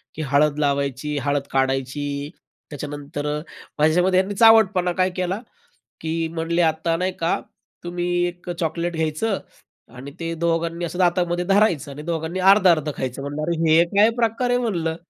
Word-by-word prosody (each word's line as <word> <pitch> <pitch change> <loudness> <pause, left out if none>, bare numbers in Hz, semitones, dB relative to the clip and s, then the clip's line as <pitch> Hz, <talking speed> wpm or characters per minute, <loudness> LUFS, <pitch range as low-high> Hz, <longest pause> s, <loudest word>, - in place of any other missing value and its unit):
की 160 - -5
हळद 150 +1 +3
लावायची, 140 0 -1
हळद 145 -1 -1
काढायची, 135 +1 0 0.6
त्याच्यानंतर 145 0 -6 0.5
माझ्याच्यामध्ये 180 +4 +3
त्यांनी 200 +1 -5
चावटपणा 210 -5 +5
काय 185 0 +3
केला 185 +2 -2 0.6
की 160 0 -3 0.2
म्हणले 170 +1 0
"आता 165 +1 +1
नाही 185 +1 -1
का 165 +1 0 0.4
तुम्ही 175 0 -3 0.2
एक 175 0 -8
चॉकलेट 170 0 -2
घ्यायचं 160 +6 -1 0.6
आणि 135 +3 -9
ते 165 0 -3
दोघांनी 170 +1 -1
असं 175 +2 -6
दातामध्ये 175 0 +1
धरायचं 195 -7 +2
आणि 145 +2 -8
दोघांनी 165 +2 -3
अर्ध 190 +1 +5
अर्धं 155 -3 +3
खायचं." 130 +1 -4
म्हणलं, 145 +2 -5
"अरे 170 0 -1
हे 165 +2 +6
काय 210 +3 +6
प्रकार 235 +2 0
आहे?" 245 0 +2
म्हणलं. 170 -9 -1
165 Hz, 150 wpm, -22 LUFS, 150-185 Hz, 0.6 s, हे